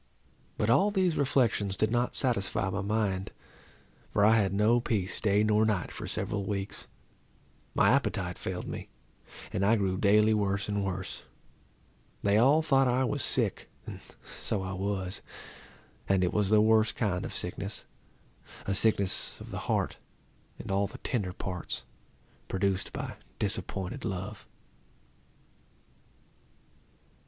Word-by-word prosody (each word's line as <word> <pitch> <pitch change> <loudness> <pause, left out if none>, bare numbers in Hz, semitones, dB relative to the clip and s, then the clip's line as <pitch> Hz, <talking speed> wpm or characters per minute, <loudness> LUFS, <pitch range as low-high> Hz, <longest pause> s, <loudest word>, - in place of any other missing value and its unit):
But 105 - +2
all 195 +12 +5
these 185 -5 +1
reflections 115 -8 +1
did 110 +3 +1
not 120 +1 0
satisfy 105 -5 +2
my 100 +2 -2
mind, 100 -2 -1 0.8
for 105 - +3
I 110 +1 +6
had 100 -3 +1
no 105 +4 +3
peace 105 -6 -1
day 105 -1 +3
nor 105 0 +3
night 105 -5 0
for - - -7
several 100 -2 -2
weeks. 100 0 -4 0.9
My - - +5
appetite - - 0
failed - - -4
me, - - -6 0.6
and 95 - 0
I 105 +3 +5
grew 95 -3 0
daily 105 +1 +5
worse 100 -1 0
and 100 -1 -1
worse. 95 -1 -4 1.0
They 100 +1 +4
all 145 +7 +5
thought 135 -3 +4
I 125 +1 +2
was 140 +2 -1
sick; - - 0 0.2
and - - -7 0.3
so 95 - -3
I 95 0 -4
was. 95 0 -3 0.9
And 95 -1 +3
it 90 - 0
was 105 -2 +1
the 105 0 +6
worst 110 0 +4
kind 95 -6 0
of - - -5
sickness, 100 +3 -4 0.8
a 100 - 0
sickness 100 -1 +1
of - - -10
the - - -4
heart, - - 0 0.6
and - - -6
all 100 +1 +2
the - - -11
tender 105 -8 -2
parts, 90 -1 -5 0.6
produced 95 0 0
by - - -5 0.2
disappointed 100 +8 -3
love. 100 0 -5
105 Hz, 140 wpm, -29 LUFS, 95-110 Hz, 1.0 s, I